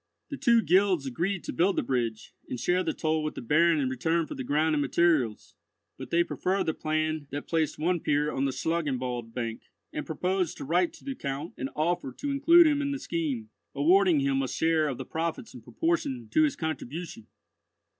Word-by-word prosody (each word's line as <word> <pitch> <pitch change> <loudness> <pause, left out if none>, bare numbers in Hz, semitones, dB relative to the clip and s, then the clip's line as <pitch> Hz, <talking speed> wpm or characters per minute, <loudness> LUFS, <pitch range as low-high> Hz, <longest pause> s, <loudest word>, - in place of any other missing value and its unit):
The 280 - -4
two 235 -5 +4
guilds 185 -4 +3
agreed 175 +9 -2
to - - -5
build 185 +3 +2
the - - 0
bridge, 115 -4 -2 0.2
and 125 - -4
share 180 +6 +1
the - - -1
toll 155 -1 -1
with 155 - -3
the - - -5
Baron 160 +5 +3
in 135 - +1
return 160 +6 0
for - - -7
the 130 - -5
ground 155 +4 +1
and 150 - +1
materials; 140 -6 +1 0.4
but - - -9
they 170 0 +3
preferred 190 +3 -1
the 160 - -1
plan 155 -1 -2
that 145 +1 -5
placed 160 -3 0
one 175 +3 +1
pier 150 0 +1
on 135 - -1
the 135 - 0
Schlangenwald 130 -7 -2
bank, 115 -2 -3 0.3
and 150 - -3
proposed 180 +2 -1
to - - -6
write 175 +4 +2
to - - -16
the 275 - -3
Count 145 - -5
an 130 - -4
offer 155 -3 0
to 285 - -4
include 335 +5 +6
him 295 -2 +2
in 280 - -1
the 280 - -2
scheme, 140 - -3 0.2
awarding 170 +2 +4
him 135 0 +1
a 135 - -1
share 160 +2 +1
of 135 -4 -3
the 130 - -6
profits 165 - -4
in 125 - -10
proportion 290 - -2
to 315 - +4
his 295 - -1
contribution. 160 -5 -5
160 Hz, 205 wpm, -28 LUFS, 135-180 Hz, 0.4 s, include